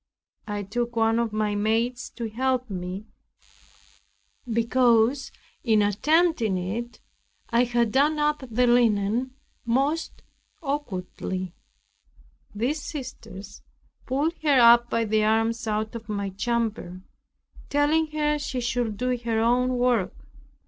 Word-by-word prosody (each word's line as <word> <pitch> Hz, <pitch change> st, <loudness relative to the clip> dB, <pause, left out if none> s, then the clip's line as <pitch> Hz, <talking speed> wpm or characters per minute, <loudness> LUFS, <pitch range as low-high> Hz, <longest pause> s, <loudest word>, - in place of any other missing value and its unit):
I 205 Hz, -1 st, -3 dB
took 235 Hz, +4 st, -3 dB
one 225 Hz, 0 st, +2 dB
of 235 Hz, -2 st, 0 dB
my 215 Hz, -1 st, 0 dB
maids 225 Hz, +4 st, 0 dB
to 235 Hz, -2 st, -4 dB
help 255 Hz, +1 st, -1 dB
me, 185 Hz, +2 st, -5 dB, 1.5 s
because 235 Hz, +2 st, +2 dB, 0.3 s
in 220 Hz, -4 st, +3 dB
attempting 235 Hz, -, +2 dB
it 225 Hz, +7 st, -4 dB, 0.5 s
I 235 Hz, +1 st, +4 dB
had 240 Hz, -2 st, +1 dB
done 290 Hz, +5 st, +3 dB
up 300 Hz, 0 st, +1 dB
the 245 Hz, +2 st, +2 dB
linen 240 Hz, +1 st, +2 dB, 0.3 s
most 275 Hz, +7 st, -1 dB, 0.4 s
awkwardly. 185 Hz, -, -4 dB, 1.0 s
These 260 Hz, +8 st, -1 dB
sisters 225 Hz, -, -8 dB, 0.5 s
pulled 285 Hz, +6 st, 0 dB
her 245 Hz, -6 st, +7 dB
by 230 Hz, 0 st, 0 dB
the 215 Hz, 0 st, +1 dB
arms 225 Hz, +1 st, +1 dB
out 215 Hz, 0 st, -1 dB
of 230 Hz, -2 st, -8 dB
my 200 Hz, -2 st, -2 dB
chamber, 215 Hz, -4 st, -2 dB, 0.7 s
telling 300 Hz, +3 st, +2 dB
her 300 Hz, -1 st, 0 dB
she 265 Hz, -3 st, -3 dB
should 240 Hz, -3 st, -1 dB
do 250 Hz, +2 st, 0 dB
her 230 Hz, -1 st, -1 dB
own 250 Hz, +2 st, +2 dB
work. 240 Hz, -6 st, +1 dB
235 Hz, 115 wpm, -25 LUFS, 215-255 Hz, 1.5 s, her